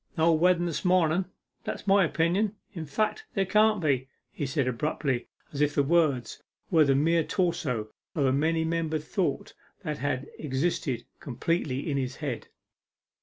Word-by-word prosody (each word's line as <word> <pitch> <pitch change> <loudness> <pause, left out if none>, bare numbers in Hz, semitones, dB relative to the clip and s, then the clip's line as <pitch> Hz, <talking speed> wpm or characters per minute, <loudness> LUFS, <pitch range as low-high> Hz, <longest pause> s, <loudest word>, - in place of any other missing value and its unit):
'No 165 +1 +4
wedden 175 +2 +3
this 165 -4 -2
mornen 180 -1 +3 0.4
that's - - -5
my 195 0 +5
opinion. 175 +6 +1 0.2
In 165 -5 -6
fact, 215 - -1
there 195 -1 +2
can't 215 +2 +4
be,' 135 -6 +1 0.2
he 145 - -3
said 135 -1 0
abruptly, 130 0 -1 0.3
as 140 - -2
if 150 0 +2
the 140 - +4
words 140 -7 +1 0.3
were 160 -3 +6
the 140 -2 +3
mere 165 +4 +3
torso 160 - -1 0.3
of 145 -4 +2
a 130 - +3
many 160 +3 +1
membered 160 -2 -1
thought 155 -2 -2 0.3
that 150 -4 -3
had 140 -1 -2
existed 135 -4 -1
complete 150 +5 -1 0.2
in 140 -3 0
his 130 -1 -2
head. 140 -6 -4
155 Hz, 160 wpm, -28 LUFS, 140-175 Hz, 0.4 s, were